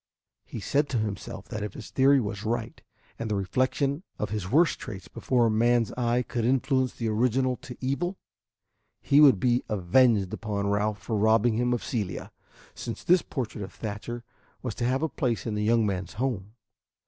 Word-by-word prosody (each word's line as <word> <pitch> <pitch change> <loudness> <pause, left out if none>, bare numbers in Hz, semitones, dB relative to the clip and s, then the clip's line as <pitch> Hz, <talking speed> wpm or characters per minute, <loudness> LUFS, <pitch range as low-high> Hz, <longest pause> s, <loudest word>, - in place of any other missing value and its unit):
He - - -7
said 145 +8 +1
to 130 - 0
himself 105 -3 -4
that 110 - -4
if 105 - -4
his - - -9
theory 135 +1 +5
was 100 -3 -4
right, 115 0 -3 0.4
and 115 - -3
the 105 - 0
reflection 130 - 0 0.2
of 105 - -3
his 105 -4 -3
worst 160 - +3
traits 95 -3 -8
before 125 -2 +1
a 115 - +2
man's 120 +1 +3
eye 120 0 +1
could 120 -1 -3
influence 130 +1 +1
the 115 - -3
original 125 +4 +1
to 125 - -10
evil, 175 +9 -2 0.8
he 145 +2 +4
would 135 -10 +7
be 120 +2 +2
avenged 105 +1 +3
upon 105 -2 -2
Ralph 105 +1 0
for 115 - -2
robbing 110 +2 +4
him 120 +2 +1
of 120 - -1
Celia, 105 -7 -3 0.4
since 115 - -6
this 180 0 +5
portrait 120 -7 -4
of 95 - -7
Thatcher 115 +3 -5 0.4
was 125 -4 -2
to 120 - -2
have 130 +4 +1
a - - +2
place 125 -7 -2
in 115 - -2
the 105 0 -1
young 115 +1 +3
man's 95 -3 -3
home. 110 -3 -3
115 Hz, 185 wpm, -27 LUFS, 105-130 Hz, 0.8 s, would